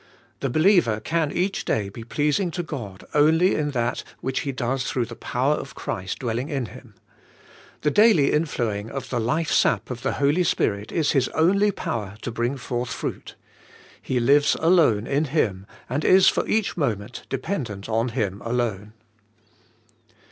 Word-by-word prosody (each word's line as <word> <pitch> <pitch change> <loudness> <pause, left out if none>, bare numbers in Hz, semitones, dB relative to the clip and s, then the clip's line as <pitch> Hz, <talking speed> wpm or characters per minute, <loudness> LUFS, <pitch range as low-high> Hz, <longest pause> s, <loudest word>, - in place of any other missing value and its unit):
The 135 - -1
believer 155 - +3
can 155 +5 -1
each 190 +3 -1
day 105 -2 0
be 115 +4 -9
pleasing 150 - 0
to 175 - -1
God 115 - -7
only 160 +5 +4
in 150 -1 0
that 120 -4 -1 0.2
which 130 0 -2
he 140 - -2
does 130 0 -2
through 125 -2 -1
the 120 +1 -9
power 130 +6 0
of 140 - -6
Christ 95 +1 -4
dwelling 120 +3 -3
in 135 -5 -2
him. 120 -2 -13 0.9
The 150 - +1
daily 205 -7 +5
inflowing 115 -9 -1
of 135 +1 -6
the 125 - 0
life 150 +8 0
sap - - +2
of 120 -1 -5
the - - -1
Holy 145 +6 +2
Spirit 105 -10 0
is 160 -3 +1
his 135 -3 +2
only 200 +6 +4
power 105 - -4
to 120 - -3
bring 120 +4 -1
forth 120 -1 -3
fruit. - - -5 0.7
He 130 - -1
lives 145 +4 +4
alone 160 - +4
in 145 +3 +1
Him 105 - -1 0.2
and 140 +5 -2
is 190 0 +6
for - - -1
each 220 -2 0
moment 120 - -2
dependent 115 - -4
on 115 +2 0
Him 105 -5 -2
alone. 115 -3 -2
130 Hz, 165 wpm, -24 LUFS, 115-155 Hz, 0.9 s, is